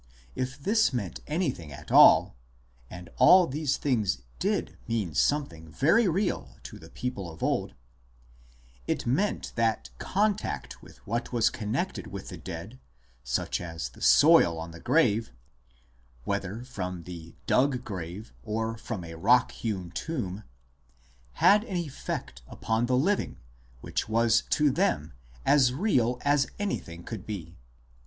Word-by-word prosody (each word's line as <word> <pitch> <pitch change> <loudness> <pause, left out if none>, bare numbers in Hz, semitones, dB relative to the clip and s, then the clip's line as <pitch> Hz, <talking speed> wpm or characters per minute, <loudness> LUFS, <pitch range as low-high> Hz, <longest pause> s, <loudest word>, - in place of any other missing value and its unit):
* 65 - -28
If 130 - -10
this 215 +9 +2
meant 105 - -4
anything 145 - -2
at 70 0 -10
all - - +7 0.5
(and 90 -1 -9
all 180 +8 +7
these 145 -1 -1
things 105 - 0 0.2
did - - -1
mean 110 -8 -1
something 80 - 0
very 195 - +3
real 185 +1 -1
to - - -9
the - - -13
people 110 -8 -5
of 80 - -10
old), - - -1 1.1
it - - -1
meant 155 +13 0
that 115 -1 0
contact 205 +1 -1
with - - -17
what 115 +4 -3
was 115 -3 +2
connected 120 - -3
with 100 -1 -8
the 90 - -7
dead, 95 +8 -8 0.4
such - - -1
as 80 -5 -5
the - - -17
soil 85 -1 +6
on 80 +1 -6
the 85 - -11
grave 120 - +2 0.9
(whether 100 - -3
from 90 -8 -5
the 85 -1 -10
dug 130 -1 +2
grave 95 +2 -7
or 115 0 -3
from 110 -7 -5
a 85 0 -8
rock 120 +10 +3
hewn 95 -7 -4
tomb), 105 - -4 0.9
had 205 - +5
an 190 -7 -3
effect 140 - -5
upon 110 +2 -1
the 125 0 +2
living 195 +10 0 0.4
which - - -3
was 115 +1 +3
to 150 -2 +3
them 80 - 0 0.3
as 130 -3 +4
real 130 - +1
as 145 -1 +3
anything 85 - -4
could 110 -3 -7
be. 90 -5 -6
115 Hz, 140 wpm, -28 LUFS, 90-140 Hz, 1.1 s, all